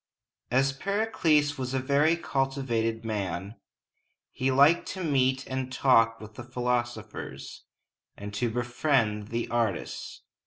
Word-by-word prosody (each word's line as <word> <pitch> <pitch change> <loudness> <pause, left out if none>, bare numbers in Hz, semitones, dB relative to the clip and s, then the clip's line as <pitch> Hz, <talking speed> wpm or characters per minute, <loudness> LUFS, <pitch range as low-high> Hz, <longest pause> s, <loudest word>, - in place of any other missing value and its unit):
As 135 +2 +2
Pericles 155 -5 +1
was 130 0 -3
a - - +2
very 145 +5 +3
cultivated 130 -7 -1
man, 100 -1 -3 0.7
he 130 - -1
liked 140 +6 +5
to 190 -1 -5
meet 130 -3 +1
and 130 -1 -4
talk 115 -4 +3
with 110 0 -11
the 120 - -8
philosophers, 120 -3 -4 0.5
and 100 0 -7
to 115 +4 0
befriend 120 -3 0
the 115 +1 -2
artists. 115 -3 -2
125 Hz, 120 wpm, -28 LUFS, 115-140 Hz, 0.7 s, liked